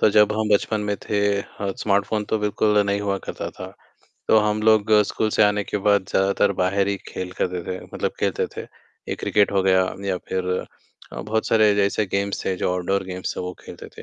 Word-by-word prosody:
तो 105 - +5
जब 105 0 +5
हम 110 0 -1
बचपन 105 +1 0
में 105 -1 -2
थे 105 - -3 0.2
अ, 100 -1 -5
स्मार्टफ़ोन 100 +1 0
तो 110 - -1
बिल्कुल 105 0 +1
नहीं 100 0 0
हुआ 100 -1 -1
करता - - -5
था। - - -10 0.5
तो 110 - +6
हम 105 0 +1
लोग 110 -1 +4
स्कूल 110 - -1
से 110 - +3
आने 105 0 +3
के - - -3
बाद 100 -2 +4
ज़्यादातर 100 +1 +2
बाहर 100 +2 +1
ही 100 - 0
खेल 90 -1 -5
करते 90 -1 -1
थे 95 0 -4
मतलब - - -1
खेलते - - 0
थे। - - -4 0.5
ये - - -1
क्रिकेट 105 -1 +1
हो 95 -1 +2
गया 95 -1 +4 0.2
या 95 - 0
फ़िर 95 -1 -1 0.7
अ, - - -5
बहुत 110 +1 -1
सारे 110 -2 +4
जैसे 100 +1 +1
गेम्स 100 +1 -2
थे 95 - 0
जो 90 - -1
आउटडोर 95 +2 -1
गेम्स 90 0 -5
थे - - -3
वो 90 0 -4
खेलते - - -10
थे। - - -7
100 Hz, 215 wpm, -23 LUFS, 95-105 Hz, 0.7 s, तो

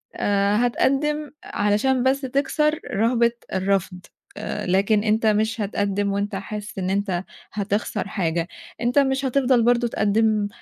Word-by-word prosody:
آآ، 200 0 +1
هتقدّم 295 +4 0
علشان 210 +5 +1
بس 265 +1 +2
تكسر 295 +3 0
رهبة 235 +3 +2 0.2
الرفض 190 -1 0 0.4
آآ، - - -4
لكن 200 +3 +2
أنت 220 +1 +1
مش 220 +1 +1
هتقدّم 200 0 -1
وأنت 200 +1 -2
حاسس 210 +3 -6
إن 185 0 -2
أنت 190 -2 -1 0.3
هتخسر 205 0 -2
حاجة، 170 -4 -1 0.3
أنت 245 +4 +3
مش 270 0 +1
هتفضل 255 -2 +2
برضه 240 0 +3
تقدّم 215 -1 +1
215 Hz, 130 wpm, -23 LUFS, 200-250 Hz, 0.4 s, أنت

